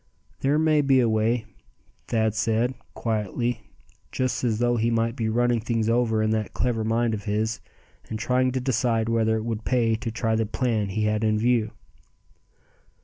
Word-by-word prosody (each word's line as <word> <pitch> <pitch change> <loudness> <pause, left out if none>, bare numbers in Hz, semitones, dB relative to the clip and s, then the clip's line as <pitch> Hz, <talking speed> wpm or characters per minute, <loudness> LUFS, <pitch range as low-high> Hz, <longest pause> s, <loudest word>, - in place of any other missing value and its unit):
"There 140 +2 +2
may 155 -1 +3
be 135 -2 +4
a 120 - +3
way," 110 +1 +1 0.6
Thad 110 -2 +1
said, 115 +2 0 0.2
quietly, 110 0 -2 0.4
just 130 0 -1
as 115 -3 +1
though 120 +1 +2
he 115 +1 +1
might 115 0 0
be 110 -3 -1
running 120 +1 +2
things 115 0 -1
over 115 -2 +2
in 110 - +1
that 110 -2 -2
clever 115 0 0
mind 115 +1 +1
of 105 0 -5
his, 110 +2 -1 0.5
and 110 - -3
trying 130 +3 +1
to 130 - 0
decide 120 -3 0
whether 110 -1 +2
it 110 - -4
would 115 -2 -3
pay 120 -2 +2
to 115 +1 -3
try 115 0 -1
the 110 -1 0
plan 110 -3 -1
he 105 +3 -1
had 105 +1 0
in 110 -1 +2
view. 115 -1 +2
115 Hz, 180 wpm, -25 LUFS, 110-120 Hz, 0.6 s, be